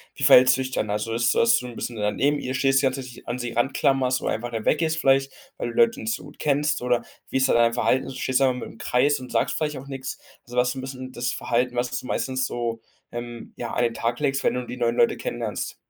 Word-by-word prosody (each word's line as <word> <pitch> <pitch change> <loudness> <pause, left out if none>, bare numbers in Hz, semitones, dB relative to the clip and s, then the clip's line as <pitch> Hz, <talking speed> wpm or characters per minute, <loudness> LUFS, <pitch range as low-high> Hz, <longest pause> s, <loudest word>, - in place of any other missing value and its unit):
Wie - - -6
verhältst 130 +1 +8
du 130 - -2
dich 130 0 -4
dann? 110 -4 -1
Also, 105 +2 -2
ist 120 +1 +2
dass 115 0 +5
du 125 - -5
'n 120 - -9
bisschen 120 0 -5
da 105 0 0
neben 145 +5 +1
ihr 130 - -4
stehst, 135 0 +3
die - - +1
ganze 135 +1 0
Zeit 130 - -9
dich 120 - -15
an 120 +1 -2
sie 120 -1 -3
ran 120 +4 0
klammerst, 130 -2 +2
oder - - -1
einfach 120 +2 -3
mal 115 -2 -3
weggehst 160 +1 +2
vielleicht, 135 -1 +3 0.2
weil - - -3
du - - -6
die - - -2
Leute 230 +3 +3
nicht 225 -4 -1
so - - -6
gut 145 - -14
kennst, 150 0 +1
oder 125 -1 +1 0.3
wie - - 0
ist 130 0 +2
da - - +4
dein 115 0 +4
Verhalten? 130 +2 +1
Stehst 130 0 0
du - - +3
da - - +4
einfach 125 0 -2
mitten - - -7
im - - -17
Kreis 140 +6 +2
und 125 -1 -9
sagst - - +1
vielleicht 150 -2 -2
auch 135 +1 -9
nichts? 135 -1 -6 0.3
Also, 120 - -10
was 125 0 +3
ist 125 - -3
'n 130 - -5
bisschen 130 -1 -7
das 125 -1 -2
Verhalten, 125 +1 0
was 120 0 -1
du - - -12
meistens 130 0 -1
so, 120 -2 -3 0.3
ähm, 120 -1 -7
ja, 120 -1 -5
an 120 - +1
den 115 -1 +1
Tag 115 +1 -2
legst, 140 -2 0
wenn - - +2
du 125 0 -3
die 125 - -7
neuen 120 -1 +1
Leute - - +3
kennenlernst? - - -4
125 Hz, 290 wpm, -24 LUFS, 120-135 Hz, 0.3 s, verhältst